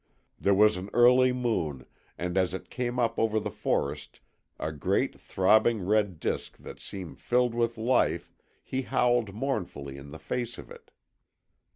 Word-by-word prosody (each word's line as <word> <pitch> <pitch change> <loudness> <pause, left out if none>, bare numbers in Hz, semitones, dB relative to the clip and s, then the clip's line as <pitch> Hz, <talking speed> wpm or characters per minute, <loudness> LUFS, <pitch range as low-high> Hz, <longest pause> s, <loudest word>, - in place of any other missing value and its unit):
There 100 0 +3
was 105 0 +5
an 95 +2 -6
early 125 +1 +6
moon, 90 - -2 0.3
and 90 +1 -3
as 95 -1 +1
it - - -9
came 125 -1 -2
up 115 -2 +1
over 110 -1 +2
the - - -4
forest, 75 +1 -2 0.4
a 80 - -2
great 75 -2 -1
throbbing 110 +2 +3
red 100 -4 +1
disc - - -3
that - - -11
seemed 95 -4 -8
filled 125 -1 +1
with 120 0 0
life, 120 +3 +1 0.3
he 130 - -2
howled 120 -5 +1
mournfully 90 - -3
in 70 +1 -10
the 80 - -9
face 120 +6 -4
of - - -11
it. - - -13
110 Hz, 160 wpm, -28 LUFS, 90-120 Hz, 0.4 s, early